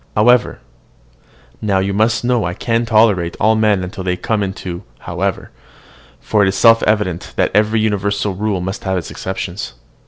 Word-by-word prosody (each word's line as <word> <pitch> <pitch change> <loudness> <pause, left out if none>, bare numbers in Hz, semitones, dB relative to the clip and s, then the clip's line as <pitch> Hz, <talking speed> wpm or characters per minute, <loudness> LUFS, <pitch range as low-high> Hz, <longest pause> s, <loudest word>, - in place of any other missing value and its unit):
However," 120 +2 +3 1.0
now, 100 -3 +1
you 95 +1 0
must 110 +2 +1
know 120 -2 +1
I 90 0 -3
can 115 +2 -1
tolerate 105 -6 +2
all 110 +1 +3
men 105 -4 +1
till 95 - -7
they 90 -1 0
come 100 0 -1
to 90 -1 -7
"however;" - - -3 0.7
for 105 - +1
it 100 - +4
is 95 - 0
self 115 +2 +6
evident 105 -5 -1
that - - +1
every 110 +2 +2
universal 100 -1 0
rule 100 -1 -2
must 95 +5 -5
have 95 -2 -1
its 90 - -5
exceptions. 95 -6 -5
105 Hz, 165 wpm, -17 LUFS, 95-110 Hz, 1.0 s, self